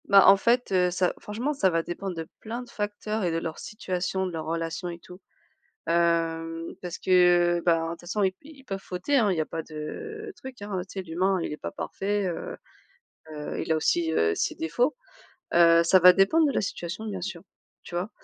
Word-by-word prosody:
Bah 195 -1 +7
en 195 - +10
fait, 240 +4 +2
heu, 180 -1 +3
ça 180 0 +1
franchement, 235 +8 -3
ça 195 -10 +2
va 165 -1 0
dépendre 180 +2 -5
de 165 -1 -5
plein 235 +3 -5
de 245 - -15
facteurs 210 +1 -3
et 175 - +1
de 165 - 0
leur 165 -1 -4
situation, 190 -2 -3
de 185 - -3
leur 160 -2 -5
relation 165 +2 -3
et 170 0 -7
tout. 180 +2 -14 0.7
Hem, 165 -1 0
parce 175 -2 -6
que 175 -1 +4
ben, 165 -2 +3
de - - -3
toute 170 - -12
façon 200 +4 -1
i 190 -1 +1
ils 285 -2 -14
peuvent 195 -7 -4
fauter, 185 +11 0
hein, 215 -6 +3
il 180 - -1
y - - +2
a - - -2
pas 165 +1 -5
de 430 - -7
truc, 260 -4 -10
hein, 205 -2 -3
tu 190 - -7
sais - - -1
l'humain 185 +2 0
il - - -3
est 150 - -5
pas - - -6
parfait, 200 0 -2
heu, - - -4 0.8
heu, 150 -1 -5
il - - 0
a - - +3
aussi, 160 +1 +1
heu, 85 - +2
ses - - -1
défauts. 240 - 0 0.6
Heu, 170 0 +6
ça 185 +3 +5
va 180 +1 +9
dépendre 200 - +4
de - - 0
la - - +1
situation, 185 +1 -4
bien 200 -3 -4
sûr, 175 -2 -5 0.4
tu - - -10
vois? 180 +5 -2
180 Hz, 220 wpm, -27 LUFS, 165-205 Hz, 0.8 s, en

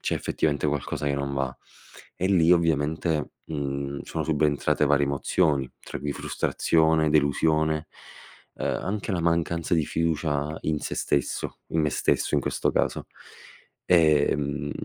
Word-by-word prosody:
c'è - - -1
effettivamente 75 -1 -1
qualcosa 75 0 -2
che 70 - +1
non 70 0 -3
va. 65 -2 -2 0.6
E 90 - 0
lì 90 -4 +4
ovviamente, 80 -1 +1
mhmm, 70 -2 -4
sono - - -4
subentrate 75 -1 +1
varie 70 0 +3
emozioni, 70 -1 +1
tra - - -7
cui 75 0 -3
frustrazione, 80 +1 +1
delusione, 75 +1 +2 0.7
ehm, - - -3 0.2
anche 100 +1 -3
la 90 - 0
mancanza 85 +1 0
di 80 -2 +2
fiducia 75 -2 -1
in 75 -1 -1
sé - - -4
stesso, 70 - -1
in 80 - 0
me 75 -1 +1
stesso - - 0
in - - +3
questo - - 0
caso. 65 - 0 0.8
Ehm, 75 -3 +2
75 Hz, 135 wpm, -26 LUFS, 70-80 Hz, 0.8 s, lì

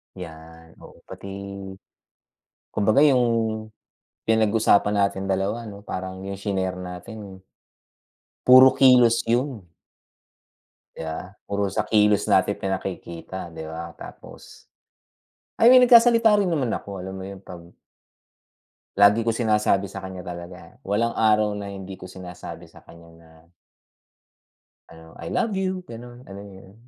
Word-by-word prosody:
'Yan, 80 -2 -12
oo, - - -16
pati - - -10 1.4
kumbaga 110 +5 +2
'yung 135 -5 +4 1.0
pinag-usapan 110 -2 +2
nating 95 0 -5
dalawa 100 +4 -2
ano, 100 -1 -10
parang 95 -1 -6
'yung 100 0 -6
shinare 95 -2 -3
natin 95 +2 -9 1.0
puro 130 +1 +9
kilos 125 -4 +5
'yun. 120 -3 -1 1.3
Yeah, 80 +4 -7 0.2
puro 100 0 -1
sa - - +1
kilos 105 -2 +3
natin - - +3
pinakikita, 95 -2 -6
di 80 -1 -9
ba? 80 +1 -7
Tapos, - - -13 0.9
I 230 - +6
mean, 255 +1 +8
nagsasalita 235 -2 +6
rin 200 - +1
naman 145 -9 -1
ako. 100 -2 -6
Alam 95 +1 -7
mo - - -7
'yun, 100 -1 -10
pag 85 -2 -11 1.3
Lagi 100 +3 +5
ko 115 - +1
sinasabi 105 -4 +1
sa 95 -1 -8
kaniya 95 -1 -8
talaga, 85 -1 -10
walang 115 +4 -1
araw 105 -1 +2
na 100 - -6
hindi 95 -1 -9
ko - - -11
sinasabi 90 -1 -10
sa - - -20
kaniya 85 0 -16
na 80 -1 -20 1.6
ano 80 0 -14
"I - - -9
love 225 -3 0
you," 190 -1 0 0.2
gano'n, 120 +1 -11
alam 100 +1 -9
mo 100 -1 -13
'yun? 95 0 -17
100 Hz, 130 wpm, -23 LUFS, 90-115 Hz, 1.6 s, puro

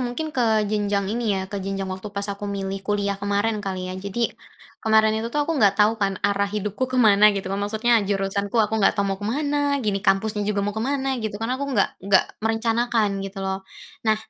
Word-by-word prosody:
mungkin 255 +6 -3
ke 220 -4 +2
jenjang 205 -1 0
ini 225 -4 0
ya, 190 - -2
ke 200 0 -5
jenjang 195 0 -3
waktu 190 +3 -6
pas 200 0 -4
aku 205 +1 -6
milih 195 -1 -3
kuliah 200 0 -1
kemarin 205 +2 0
kali 185 -2 -4
ya. - - -6
Jadi, 200 +4 -2 0.5
kemarin 220 0 +4
itu 220 +1 -2
aku 295 +5 0
nggak 200 -1 +4
tahu 210 +1 +4
kan 195 -1 +1
arah 200 0 +2
hidupku 210 +5 -2
ke 255 - -3
mana 210 -3 +6
gitu, 195 - -4
maksudnya 220 +3 +2
jurusanku 200 +2 -1
aku 220 0 +2
nggak 195 - +4
tahu 200 -1 +1
mau 195 - -5
ke 205 - -4
mana. 290 +2 0
Gini 200 -2 0
kampusnya 210 +2 +1
juga 200 -1 0
mau 205 - -1
ke 220 - -4
mana, 265 0 -1
gitu, 215 -2 -3
karena 245 +5 -2
aku 280 - -2
nggak 215 -8 +2
nggak 195 0 +4 0.2
merencanakan 225 -2 +1
gitu 195 0 -6
loh. 190 0 -2 0.5
Nah, 215 - +4
210 Hz, 210 wpm, -23 LUFS, 200-225 Hz, 0.5 s, mana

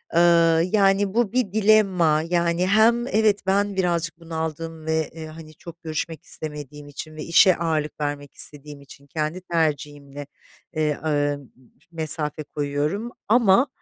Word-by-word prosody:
Iıı, 170 -1 +5
yani 195 -1 +3
bu 235 -3 +1
bir 245 -6 0
dilemma. 195 -8 +3
Yani 170 +1 +1
hem 230 +4 +3
evet 215 -4 +2
ben 200 +1 +1
birazcık 170 -3 -1
bunaldım 160 -1 -5
ve 160 0 +1
e 160 -1 -8
hani 155 0 -11
çok 170 +2 -13
görüşmek 160 0 -4
istemediğim 150 -1 -7
için 155 +2 -9
ve 155 - -6
işe 175 +2 +5
ağırlık 155 -3 -2
vermek 145 -1 -4
istediğim 145 -1 -3
için 140 0 -16
kendi 155 +4 -3
tercihimle, 145 -4 -3 0.5
eee, 155 -2 0
ııı, 145 -2 +1
m 140 - -15 0.4
mesafe 155 -2 -2
koyuyorum 150 +11 -3 0.2
ama, 230 +3 +4
165 Hz, 140 wpm, -23 LUFS, 150-190 Hz, 0.5 s, Iıı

